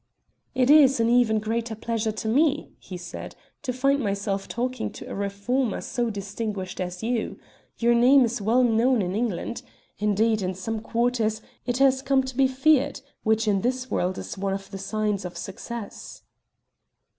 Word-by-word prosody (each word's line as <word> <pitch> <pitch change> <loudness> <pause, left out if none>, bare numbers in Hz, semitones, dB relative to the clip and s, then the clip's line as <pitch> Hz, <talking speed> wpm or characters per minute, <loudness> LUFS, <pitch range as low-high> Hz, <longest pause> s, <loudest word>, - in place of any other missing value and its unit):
"It 260 +1 +4
is 275 -4 +7
an 230 0 +3
even 240 -3 +4
greater 225 +1 -2
pleasure 225 0 -1
to 220 +1 -5
me," 290 +6 +2
he 185 - -8
said, 175 0 -8 0.3
"to 265 - -2
find 275 +3 +2
myself 200 -3 -2
talking 250 0 -2
to - - -9
a - - -6
reformer 200 +5 -1
so 240 -1 -2
distinguished 200 -2 -4
as 180 +1 -5
you. 235 -1 -1 0.4
Your 235 0 +3
name 250 +3 +6
is 230 -1 -3
well 230 +5 +3
known 235 0 +3
in 180 0 -2
England. 230 +1 -2 0.4
Indeed, 210 +1 +2
in 185 0 -2
some 220 +4 -3
quarters, 225 -1 0 0.2
it 245 0 0
has 265 -1 +4
come 270 -1 +2
to 260 -1 -6
be 270 +1 +4
feared, 270 +2 +2 0.2
which 220 0 +1
in 200 -2 +2
this 255 +2 -2
world 185 +1 0
is - - -6
one 195 0 -1
of 195 0 -6
the 195 - -6
signs 210 0 -1
of 180 -1 -6
success." 215 +2 -7
225 Hz, 170 wpm, -25 LUFS, 200-250 Hz, 0.4 s, is